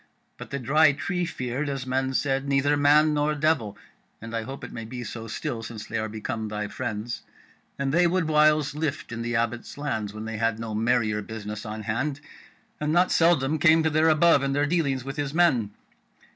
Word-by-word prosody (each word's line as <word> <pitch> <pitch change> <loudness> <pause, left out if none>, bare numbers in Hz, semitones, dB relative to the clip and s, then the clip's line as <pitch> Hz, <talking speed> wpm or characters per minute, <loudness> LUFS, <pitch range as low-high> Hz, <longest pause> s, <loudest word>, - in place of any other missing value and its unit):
But - - -8
the 140 - -3
Dry 145 +4 +4
Tree 180 +4 -2
feared, 135 -2 -3
as 135 -2 -3
men 130 +1 -1
said, 135 0 0
neither 140 +1 +3
man 150 +2 +4
nor 150 +1 +1
devil 145 -9 0 0.4
(and 115 +1 -7
I 115 - -1
hope 135 +5 -8
it - - -7
may 115 - -6
be 120 +2 -6
so 115 -1 -7
still 120 +1 -4
since 110 -1 -7
they 115 - -3
are 110 0 -3
become 110 +1 -4
thy 105 0 -4
friends), 110 +3 -4 0.6
and 140 0 -1
they 175 +2 +4
would 180 -1 0
whiles 150 -1 +3
lift 150 -5 -3
in 115 0 -4
the 120 +1 -2
Abbot's 120 +3 -2
lands 110 -8 -3
when 110 +1 -7
they 110 -1 -4
had 115 0 0
no 115 -1 -5
merrier 110 -1 +1
business 105 0 -7
on 110 0 -5
hand, 130 +7 -2 0.6
and 150 0 -1
not 175 +3 +3
seldom 155 -3 +3
came 160 +1 +5
to 160 - +1
their 155 +2 +4
above 155 -1 +5
in 135 0 0
their 145 +1 +2
dealings 145 -5 0
with 135 +2 -6
his 145 0 -3
men. 140 -12 +3
135 Hz, 205 wpm, -26 LUFS, 115-150 Hz, 0.6 s, came